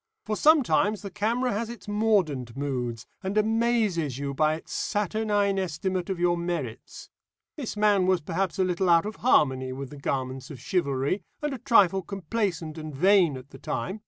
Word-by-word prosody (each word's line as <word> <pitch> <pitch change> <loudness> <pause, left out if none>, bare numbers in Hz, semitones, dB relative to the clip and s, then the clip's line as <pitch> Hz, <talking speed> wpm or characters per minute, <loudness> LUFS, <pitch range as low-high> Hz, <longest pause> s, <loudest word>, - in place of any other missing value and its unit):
For 215 - -1
sometimes 240 -8 +3
the 200 - -6
camera 230 +4 0
has 225 +2 -2
its 235 -2 -10
mordant 185 - 0
moods, 125 -5 -3 0.2
and 195 +2 -3
amazes 215 - +1
you 140 0 -3
by 155 +2 +2
its 160 - -10
saturnine 205 -1 0
estimate 185 +1 -2
of 190 -2 -2
your 175 0 +3
merits. 170 -10 -5 0.4
This 260 -8 -5
man 205 -3 +3
was 185 -1 +3
perhaps 180 +4 -2
a 190 - +3
little 185 0 0
out 170 +2 +5
of 215 - -5
harmony 130 - +2
with 135 0 -6
the 145 - -9
garments 130 -1 -3
of 140 - -9
chivalry, 140 - 0 0.2
and 295 -2 -1
a 265 - -6
trifle 200 -7 +4
complacent 175 -3 -3
and 155 -2 -7
vain 180 -2 +4
at 130 +2 -13
the - - -12
time. 195 +4 -4
185 Hz, 175 wpm, -26 LUFS, 145-210 Hz, 0.4 s, out